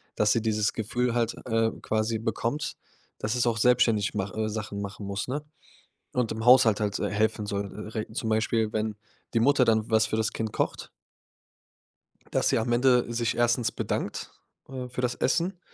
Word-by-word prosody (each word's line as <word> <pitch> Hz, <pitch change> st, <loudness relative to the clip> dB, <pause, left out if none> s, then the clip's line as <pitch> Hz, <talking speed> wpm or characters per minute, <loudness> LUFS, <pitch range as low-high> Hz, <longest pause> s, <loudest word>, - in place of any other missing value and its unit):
dass 105 Hz, 0 st, +3 dB
sie 115 Hz, -, +1 dB
dieses 110 Hz, -1 st, +1 dB
Gefühl, 120 Hz, +2 st, -1 dB
halt, 115 Hz, -1 st, 0 dB
äh, 115 Hz, -1 st, +1 dB
quasi 110 Hz, +1 st, 0 dB
bekommt, 120 Hz, +6 st, -2 dB, 0.4 s
dass 110 Hz, +3 st, -1 dB
es 120 Hz, 0 st, +1 dB
auch 115 Hz, -1 st, +1 dB
selbstständig 115 Hz, -3 st, +3 dB
mach 100 Hz, -1 st, -2 dB
äh, 110 Hz, 0 st, -1 dB
Sachen 105 Hz, -2 st, -4 dB
machen 100 Hz, 0 st, -6 dB
muss, 100 Hz, 0 st, -3 dB
ne? 145 Hz, +3 st, -2 dB, 0.7 s
Und 125 Hz, -3 st, 0 dB
im 110 Hz, 0 st, -5 dB
Haushalt 120 Hz, -4 st, +6 dB
halt, 100 Hz, -2 st, -1 dB
äh, -, -, -1 dB
helfen 105 Hz, 0 st, 0 dB
soll, 100 Hz, -1 st, -3 dB, 0.2 s
äh, -, -, -2 dB
re 110 Hz, -, -4 dB
zum 110 Hz, 0 st, -3 dB
Beispiel, 110 Hz, 0 st, +1 dB
wenn 110 Hz, -1 st, -2 dB, 0.4 s
die 115 Hz, -, +3 dB
Mutter 135 Hz, +2 st, +4 dB
dann 110 Hz, -1 st, +2 dB
was 110 Hz, 0 st, +4 dB
für -, -, -2 dB
das 110 Hz, -1 st, 0 dB
Kind 110 Hz, -1 st, -3 dB
kocht -, -, -2 dB, 1.4 s
dass -, -, +2 dB
sie -, -, +3 dB
am 115 Hz, +2 st, -1 dB
Ende 125 Hz, -1 st, +3 dB
sich 115 Hz, 0 st, 0 dB
erstens 120 Hz, -1 st, +2 dB
bedankt, -, -, -3 dB, 0.4 s
äh, 130 Hz, -2 st, -6 dB
für 125 Hz, +1 st, -5 dB
das 125 Hz, -1 st, 0 dB
Essen, 175 Hz, +6 st, 0 dB
110 Hz, 185 wpm, -27 LUFS, 110-120 Hz, 1.4 s, Haushalt